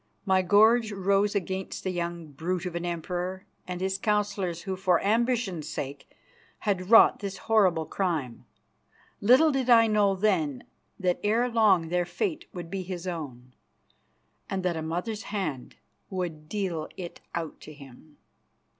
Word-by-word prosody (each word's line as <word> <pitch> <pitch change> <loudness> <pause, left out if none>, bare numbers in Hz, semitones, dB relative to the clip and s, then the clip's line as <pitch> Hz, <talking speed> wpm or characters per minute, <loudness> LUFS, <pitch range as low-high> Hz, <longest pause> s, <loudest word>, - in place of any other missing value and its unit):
My 190 -1 +3
gorge 220 +4 +4
rose 200 +1 +1
against 190 0 -3
the 185 - -1
young 170 -3 -4
brute 175 +5 -3
of 180 - -4
an 170 0 -3
Emperor 180 +2 -4 0.2
and 180 -1 -4
his 190 0 -1
councillors 205 -5 -1
who, 190 -1 -3
for 185 -2 +2
ambition's 220 - 0
sake, 140 0 -6 0.5
had 190 -3 -1
wrought 225 0 +7
this 200 -2 -5
horrible 190 -8 +3
crime. 155 -12 -2 0.8
Little 260 +9 +6
did 265 -2 -1
I 230 -1 +7
know 210 -3 +3
then 180 -9 0 0.4
that 180 -2 0
ere 225 +4 +2
long 205 -8 +3
their 175 0 +1
fate 325 - -3
would 175 -2 -8
be 195 -1 -2
his 180 -1 -6
own, 130 -8 -6 1.0
and 190 -1 -2
that 180 -2 0
a 160 - -3
mother's 180 +7 -3
hand 180 -12 -4 0.3
would 170 -5 -5
deal 180 -7 -2
it 175 -2 -8
out 165 -2 -5
to - - -10
him. 145 +1 -15
185 Hz, 150 wpm, -27 LUFS, 170-205 Hz, 1.0 s, wrought